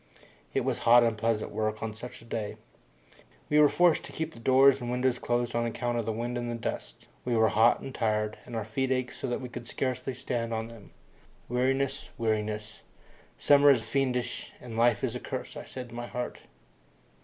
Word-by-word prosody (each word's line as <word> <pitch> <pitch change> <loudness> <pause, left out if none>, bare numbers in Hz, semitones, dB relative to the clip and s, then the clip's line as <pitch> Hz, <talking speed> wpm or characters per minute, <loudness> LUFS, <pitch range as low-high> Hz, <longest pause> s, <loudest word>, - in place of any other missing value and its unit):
It - - +1
was - - 0
hot 120 +1 +6
unpleasant 115 -1 0
work 110 0 -2
on 110 -1 -3
such 115 +2 -9
a - - -16
day. 110 -3 -4 0.9
We 150 - +4
were 150 -1 +7
forced 175 -2 +3
to - - -9
keep 160 0 -4
the - - -12
doors 135 +2 +5
and 120 - -4
windows 125 0 +1
closed 120 0 -1
on 120 - +1
account 120 0 -2
of 115 - -3
the - - +1
wind 120 +2 -3
and 120 -1 -3
dust. - - -5 0.2
We 120 -1 0
were 110 -1 +4
hot 115 +3 +4
and 135 - -7
tired, 105 -2 0
and 120 - -7
our 110 -2 -2
feet 130 +4 -1
ached 130 -1 -1
so - - -3
that 120 +2 -2
we 125 - -5
could 120 -1 -8
scarcely 130 0 -2
stand 120 -3 -2
on 110 +1 -3
them. 115 -4 -13 0.6
Weariness! 135 +2 0
Weariness! 105 -1 -2 0.6
Summer 145 0 +6
is 125 -5 +5
fiendish 130 -2 -1
and 120 -2 -8
life 115 -1 +3
is - - 0
a - - -3
curse, - - -6
I - - -7
said 125 -2 -8
in - - -9
my 120 0 -5
heart. 125 0 -4
120 Hz, 200 wpm, -29 LUFS, 115-130 Hz, 0.9 s, were